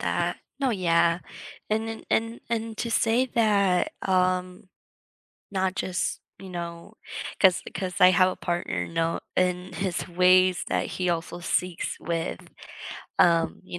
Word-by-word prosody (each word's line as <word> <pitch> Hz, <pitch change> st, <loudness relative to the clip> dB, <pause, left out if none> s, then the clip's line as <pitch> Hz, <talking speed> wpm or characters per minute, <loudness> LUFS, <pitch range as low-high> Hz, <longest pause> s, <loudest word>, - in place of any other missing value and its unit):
that. -, -, -1 dB, 0.2 s
No, 270 Hz, -3 st, +1 dB
yeah. 170 Hz, -3 st, +2 dB, 0.5 s
And 220 Hz, +1 st, 0 dB
then, 225 Hz, 0 st, -6 dB
and 225 Hz, +1 st, 0 dB
and 225 Hz, -1 st, -2 dB
to 235 Hz, -, -2 dB
say 235 Hz, +3 st, +2 dB
that, 200 Hz, -5 st, +3 dB
um, 185 Hz, 0 st, 0 dB, 0.8 s
not 190 Hz, -1 st, 0 dB
just, 185 Hz, -2 st, -2 dB, 0.2 s
you 195 Hz, -, -9 dB
know 170 Hz, +2 st, -7 dB, 0.5 s
'cause 185 Hz, -2 st, +5 dB
'cause 185 Hz, -1 st, -4 dB
I 180 Hz, 0 st, +9 dB
have 185 Hz, +1 st, +5 dB
a -, -, -6 dB
partner, 175 Hz, -, -2 dB
no, 165 Hz, -, -1 dB, 0.2 s
and 180 Hz, 0 st, 0 dB
his 185 Hz, -2 st, -2 dB
ways 185 Hz, +1 st, +4 dB
that -, -, 0 dB
he 180 Hz, -1 st, -2 dB
also 170 Hz, +1 st, -3 dB
seeks 175 Hz, 0 st, -1 dB
with, 165 Hz, -1 st, -3 dB, 0.8 s
um, 165 Hz, -1 st, +3 dB
you 175 Hz, -, -7 dB
185 Hz, 140 wpm, -26 LUFS, 175-200 Hz, 0.8 s, I